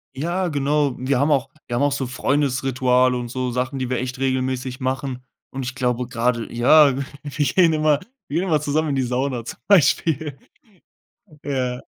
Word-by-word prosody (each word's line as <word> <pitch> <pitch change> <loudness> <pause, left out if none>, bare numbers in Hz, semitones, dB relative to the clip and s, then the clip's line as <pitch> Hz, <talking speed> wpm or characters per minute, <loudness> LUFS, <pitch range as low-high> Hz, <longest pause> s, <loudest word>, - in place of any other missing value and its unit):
Ja, 175 +6 -1
genau. 145 -2 0
Wir 130 0 0
haben 140 +3 +2
auch 135 -2 +1 0.2
wir 120 - -3
haben 130 - +1
auch 145 - +2
so 135 -2 -2
Freundesrituale 130 -1 +1
und 120 -1 -4
so 125 +1 -2
Sachen, 130 +3 -2
die 130 -1 -3
wir 130 - 0
echt 125 +1 -4
regelmäßig 130 -1 -2
machen. 130 -1 -3 0.3
Und 135 0 -5
ich 130 +1 -5
glaube 125 -1 -1
gerade 120 -1 -1
ja, 135 +3 +5
w 140 - -2 0.2
wir 145 0 -2
gehen 165 +5 +4
immer 155 -2 +2 0.3
wir 155 - -1
gehen 190 - -2
immer 155 -4 +2
zusammen 155 +1 0
in 140 - 0
die 130 - +1
Sauna 125 -1 -2
zum - - -8
Beispiel. 160 -5 +3 1.1
Ja. 130 -3 -2
135 Hz, 185 wpm, -22 LUFS, 125-145 Hz, 1.1 s, ja